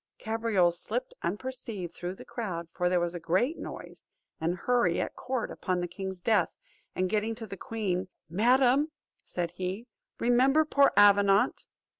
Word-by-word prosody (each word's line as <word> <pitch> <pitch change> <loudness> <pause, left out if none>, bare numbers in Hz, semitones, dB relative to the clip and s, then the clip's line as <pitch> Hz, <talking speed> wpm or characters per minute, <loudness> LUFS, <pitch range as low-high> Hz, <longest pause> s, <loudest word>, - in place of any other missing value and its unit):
Cabriole 220 -5 +1
slipped 215 +8 -3
unperceived 210 -2 -4
through 180 +1 -5
the - - -12
crowd, 180 -8 -4
for 180 0 0
there 180 0 +3
was 175 0 -1
a 175 - -5
great 190 - 0
noise - - -9 0.3
and 165 +2 0
hurry 185 -3 +1
at - - -3
court 255 -3 -3
upon 185 -1 -2
the 175 - -2
king's 190 +1 -6
death; 220 +4 +2 0.5
and 185 - +1
getting 215 +3 0
to 225 0 -7
the 195 - -7
queen, 190 -4 -2 0.2
"Madam," 250 - +3 0.3
said 175 -2 -3
he, 185 +5 -4 0.3
"remember 260 +6 +4
poor 280 -2 +4
Avenant." 200 0 +5
200 Hz, 155 wpm, -29 LUFS, 180-240 Hz, 0.5 s, Avenant